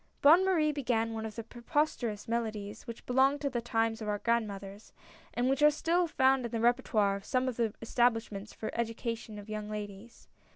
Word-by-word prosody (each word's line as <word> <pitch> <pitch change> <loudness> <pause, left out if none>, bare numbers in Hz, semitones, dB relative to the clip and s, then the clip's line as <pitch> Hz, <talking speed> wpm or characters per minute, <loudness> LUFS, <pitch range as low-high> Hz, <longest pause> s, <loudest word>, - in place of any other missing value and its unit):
Bonne 325 +6 +8
Marie 335 -5 +3
began 235 -5 0
one 220 0 -3
of 215 - -10
those 230 - -6
preposterous 240 -4 -2
melo 230 0 0
dies 210 +2 -8
which 235 -1 -8
belonged 265 +3 +3
to 280 -2 -1
the 240 - -1
times 225 -1 0
of 215 - -4
our 210 0 0
grandmothers, 205 -3 -2 0.4
and 245 +1 +1
which 270 +2 +1
are 300 - +8
still 335 +4 +1
found 265 -3 +3
in 235 - -3
the 230 - -1
repertoire 220 -4 +2
of 200 - -11
some 255 +2 0
of 255 - -3
the 230 -3 +1
establishments 225 -4 0
for - - -9
the - - -6
education 230 -1 -3
of 205 0 -9
young 215 -1 -5
ladies. 210 +1 -8
230 Hz, 205 wpm, -31 LUFS, 215-260 Hz, 0.4 s, Bonne